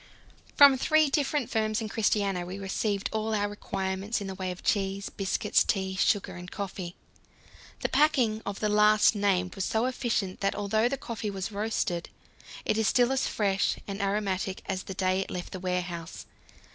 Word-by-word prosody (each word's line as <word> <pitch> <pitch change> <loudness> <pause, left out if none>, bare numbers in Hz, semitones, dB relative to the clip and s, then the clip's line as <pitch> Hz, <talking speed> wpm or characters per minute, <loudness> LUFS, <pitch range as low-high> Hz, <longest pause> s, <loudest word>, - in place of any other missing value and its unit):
From 280 -2 +8
three 310 +1 +3
different 285 -3 0
firms 215 -1 +1
in 220 - -3
Christiania 200 -4 0
we 180 +2 -6
received 200 +1 -1
all 220 0 0
our 205 0 +1
requirements 195 0 -3
in 200 - -5
the 190 - -4
way 185 -1 -4
of 180 -1 -7
cheese, 195 -1 0
biscuits, 195 -1 +1
tea, 190 -2 -1
sugar, 200 +1 +1
and 175 +1 -8
coffee. 190 -3 -5 0.9
The - - 0
packing 260 -7 +3
of 200 -1 -5
the 215 - +2
last 210 +1 +5
named 190 -3 +1
was 195 - -3
so 220 +5 +1
efficient 235 -7 -1
that, 195 0 0
although 215 +3 +1
the 275 - -2
coffee 225 -4 -4
was 195 +1 -4
roasted, 200 -5 -2 0.6
it 215 - +1
is 220 - +2
still 245 +2 +3
as 270 - +1
fresh 200 -2 +1
and 200 +1 -4
aromatic 195 -1 -1
as 190 -1 -2
the 190 - -7
day 185 0 +1
it 195 - -3
left 180 -1 -5
the 185 - -6
warehouse. 180 -2 -4
200 Hz, 180 wpm, -28 LUFS, 190-220 Hz, 0.9 s, From